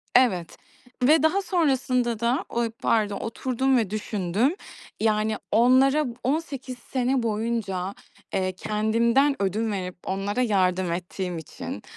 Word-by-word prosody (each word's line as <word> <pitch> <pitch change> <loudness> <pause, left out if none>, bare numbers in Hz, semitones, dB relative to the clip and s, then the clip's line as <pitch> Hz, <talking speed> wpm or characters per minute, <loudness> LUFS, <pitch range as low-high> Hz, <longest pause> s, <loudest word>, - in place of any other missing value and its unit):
Evet. 195 -10 +3 0.5
Ve 300 +4 +5
daha 360 +5 +3
sonrasında 260 - +1
da 240 +3 0
o 235 - -1 0.2
barda 210 -3 +2
oturdum 255 +5 0
ve 220 -5 0
düşündüm. 210 - 0 0.4
Yani, 215 0 +1
onlara 260 +6 +4 0.2
18 270 -2 -2
sene 255 +1 -1
boyunca, 210 -4 -2 0.4
eee, 185 -1 0
kendimden 230 +8 +2
ödün 215 +3 0
verip 185 -3 -4
onlara 195 +5 -1
yardım 185 -5 +1
ettiğim 180 +1 -4
için, 160 - -7
225 Hz, 115 wpm, -25 LUFS, 195-260 Hz, 0.5 s, Ve